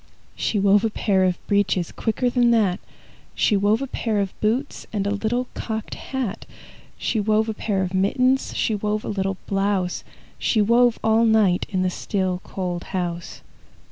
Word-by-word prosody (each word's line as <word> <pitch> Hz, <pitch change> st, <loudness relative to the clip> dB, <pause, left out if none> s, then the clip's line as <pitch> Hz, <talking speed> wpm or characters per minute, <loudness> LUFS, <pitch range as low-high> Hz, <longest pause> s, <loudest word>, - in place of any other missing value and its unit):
She 215 Hz, -, -1 dB
wove 200 Hz, +1 st, +4 dB
a 225 Hz, -, +2 dB
pair 195 Hz, -3 st, +1 dB
of 180 Hz, -2 st, +1 dB
breeches 195 Hz, -4 st, +1 dB
Quicker 230 Hz, +3 st, -1 dB
than 245 Hz, -1 st, +3 dB
that! 210 Hz, -5 st, +2 dB, 0.6 s
She 210 Hz, -, +2 dB
wove 205 Hz, +5 st, +2 dB
a -, -, -1 dB
pair 225 Hz, -5 st, -2 dB
of 195 Hz, -2 st, -1 dB
boots 240 Hz, +7 st, -1 dB
And 200 Hz, -2 st, -1 dB
a 200 Hz, -, 0 dB
little 225 Hz, +5 st, -1 dB
cocked 220 Hz, -1 st, -4 dB
hat. 260 Hz, -7 st, -4 dB, 0.5 s
She 225 Hz, -, -1 dB
wove 215 Hz, +1 st, +2 dB
a 220 Hz, -, -1 dB
pair 200 Hz, -3 st, -1 dB
of 185 Hz, 0 st, -4 dB
mittens, 255 Hz, +8 st, +1 dB
She 220 Hz, -, +1 dB
wove 210 Hz, +1 st, -2 dB
a -, -, -4 dB
little 195 Hz, -2 st, -1 dB
blouse, 195 Hz, -2 st, 0 dB, 0.4 s
She 220 Hz, -, +1 dB
wove 235 Hz, +3 st, +4 dB
all 220 Hz, +1 st, +4 dB
night 215 Hz, -5 st, +3 dB
In 185 Hz, -3 st, 0 dB
the 185 Hz, -, 0 dB
still, 185 Hz, -1 st, -2 dB
cold 180 Hz, -2 st, -4 dB
house. 175 Hz, -1 st, -4 dB
205 Hz, 175 wpm, -23 LUFS, 190-225 Hz, 0.6 s, wove